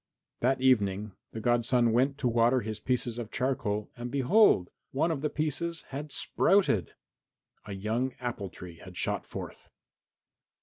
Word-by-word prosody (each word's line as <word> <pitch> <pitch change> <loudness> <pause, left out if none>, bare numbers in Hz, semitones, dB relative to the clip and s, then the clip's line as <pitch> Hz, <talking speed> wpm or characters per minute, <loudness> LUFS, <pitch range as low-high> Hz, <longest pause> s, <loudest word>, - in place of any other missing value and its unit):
That 130 +2 +2
evening 105 -5 +2 0.2
the 110 - -5
godson 120 +1 +2
went 135 +4 +2
to 125 - 0
water 120 +2 +3
his 110 0 -5
pieces 120 -2 -1
of 115 -3 -5
charcoal 105 -6 -1
and 120 0 -5
behold! 140 - +4 0.2
one 160 +5 +1
of 145 -4 -2
the 150 - 0
pieces 160 +3 -1
had 145 +2 -6
sprouted! 185 - +2 0.7
A 105 - -6
young 110 +6 -1
apple 120 -6 -4
tree 90 -1 -11
had 90 0 -12
shot - - -1
forth. - - -8
120 Hz, 145 wpm, -29 LUFS, 110-135 Hz, 0.7 s, behold